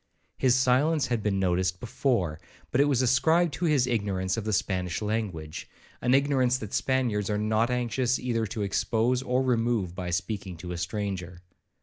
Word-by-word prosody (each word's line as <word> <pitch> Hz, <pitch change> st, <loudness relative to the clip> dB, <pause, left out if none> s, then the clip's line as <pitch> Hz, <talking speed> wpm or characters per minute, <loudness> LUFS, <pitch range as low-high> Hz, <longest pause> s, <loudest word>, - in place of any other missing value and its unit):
His 125 Hz, -2 st, +4 dB
silence 130 Hz, +4 st, +3 dB
had 120 Hz, -2 st, -1 dB
been 100 Hz, -2 st, 0 dB
noticed 90 Hz, 0 st, 0 dB
before, 110 Hz, -, -1 dB, 0.3 s
but 135 Hz, -, +3 dB
it -, -, +5 dB
was 135 Hz, -3 st, +2 dB
ascribed 160 Hz, +6 st, +3 dB
to 175 Hz, -, -2 dB
his 145 Hz, -6 st, +3 dB
ignorance 100 Hz, -6 st, -1 dB
of 115 Hz, -2 st, -4 dB
the 110 Hz, -, -1 dB
Spanish 90 Hz, -3 st, -1 dB
language, 105 Hz, -8 st, -4 dB, 0.3 s
an 125 Hz, +2 st, +3 dB
ignorance 135 Hz, -3 st, +2 dB
that 110 Hz, -5 st, -8 dB
Spaniards 120 Hz, -6 st, 0 dB
are 105 Hz, -, 0 dB
not 110 Hz, +2 st, +1 dB
anxious 125 Hz, 0 st, 0 dB
either 115 Hz, -3 st, -1 dB
to 105 Hz, +1 st, -3 dB
expose 115 Hz, +5 st, +1 dB
or 130 Hz, 0 st, 0 dB
remove 115 Hz, -7 st, 0 dB
by 90 Hz, -1 st, -5 dB
speaking 95 Hz, 0 st, -3 dB
to 90 Hz, +2 st, -7 dB
a 90 Hz, -, -4 dB
stranger. 90 Hz, -1 st, -4 dB
115 Hz, 170 wpm, -27 LUFS, 95-130 Hz, 0.3 s, it